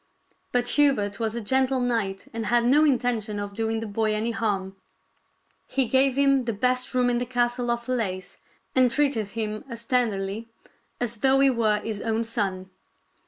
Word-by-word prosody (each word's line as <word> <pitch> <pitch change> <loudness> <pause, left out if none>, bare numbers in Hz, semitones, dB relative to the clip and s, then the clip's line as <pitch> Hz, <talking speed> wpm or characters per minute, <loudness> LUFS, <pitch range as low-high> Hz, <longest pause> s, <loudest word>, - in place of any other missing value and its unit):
But 245 0 +1
Hubert 235 -8 +2
was 225 -1 -1
a 235 - -3
gentle 260 +4 +1
knight 225 -6 -1
and 225 -1 -3
had 240 0 +3
no 285 +5 +5
intention 240 -6 0
of 205 0 -5
doing 225 +1 -2
the - - -4
boy 215 0 0
any 220 +2 -1
harm. 195 -4 -2 0.9
He 270 -1 +1
gave 265 +2 +2
him 275 -2 +3
the 230 - -1
best 250 +4 -1
room 250 -1 +3
in 240 -1 +1
the 245 - -2
castle 245 0 0
of 235 0 -1
Falaise 200 -7 -3 0.3
and 255 -1 +4
treated 260 -5 +1
him 215 0 -4
as 230 -1 -8
tenderly 220 -3 -1 0.5
as 235 -1 -2
though 265 +4 +3
he 275 -1 +5
were 215 -3 +1
his 215 -2 -4
own 225 0 0
son. 195 -5 -3
230 Hz, 175 wpm, -25 LUFS, 215-250 Hz, 0.9 s, no